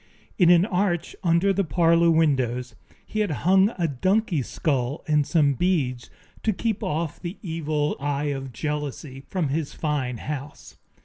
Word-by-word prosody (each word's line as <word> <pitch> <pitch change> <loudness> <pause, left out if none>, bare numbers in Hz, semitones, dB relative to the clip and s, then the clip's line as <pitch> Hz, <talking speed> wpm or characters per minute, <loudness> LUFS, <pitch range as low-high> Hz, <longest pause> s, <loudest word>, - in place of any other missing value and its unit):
In 175 -2 +6
an 175 +1 +6
arch 180 -4 -1
under 175 +3 +3
the 200 +1 +1
parlor 170 0 +3
windows 130 -7 +1 0.3
he 215 - -4
had 210 -2 +1 0.2
hung 190 +2 +5
a 170 -2 +1
donkey's 175 - 0
skull 135 -2 -1
and 150 -2 +2
some 150 -5 +3
beads, 135 -6 0 0.3
to 220 - +1
keep 220 +1 -2
off 155 +1 -2
the 175 +2 -6
evil 155 -4 -1
eye 145 0 -1
of 135 -1 -6
jealousy 145 +1 -4
from 175 -7 -1
his 150 +1 -2
fine 140 -6 -2
house. 145 +2 -7
155 Hz, 150 wpm, -24 LUFS, 140-175 Hz, 0.3 s, In